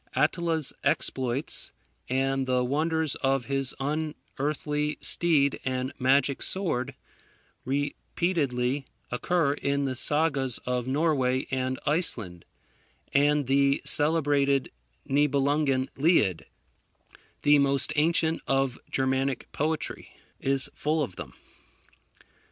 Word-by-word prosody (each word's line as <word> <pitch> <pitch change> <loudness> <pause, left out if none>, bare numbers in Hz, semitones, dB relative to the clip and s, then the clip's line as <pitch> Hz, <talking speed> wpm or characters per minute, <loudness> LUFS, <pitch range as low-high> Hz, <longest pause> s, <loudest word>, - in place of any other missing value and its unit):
Attila's 165 -4 +1
exploits, 130 +3 0 0.4
and 135 +1 0
the 125 -1 +2
wonders 155 +3 0
of 135 -2 0
his 135 -2 0
unearthly 150 0 -2
steed 150 -5 +2
and 130 0 -2
magic 135 +1 +2
sword, 140 -9 -1 0.7
repeatedly 140 -1 -1 0.2
occur 145 +3 +1
in 140 -1 -1
the 130 -1 -2
Sagas 140 -3 +1
of 125 -1 -1
Norway 135 -3 +1
and 130 0 -1
Iceland; 115 - 0 0.7
and 145 0 +3
the 140 +1 +3
celebrated 145 -3 +2 0.4
Niebelungen 140 -1 +2
Lied, 110 - +2 1.0
the 145 0 +6
most 140 +2 +2
ancient 160 +1 +2
of 135 -2 +1
Germanic 130 -1 -1
poetry, 155 +1 -3 0.2
is 135 -1 +1
full 155 +1 0
of 100 -10 -5
them. - - -8
140 Hz, 95 wpm, -27 LUFS, 130-150 Hz, 1.0 s, the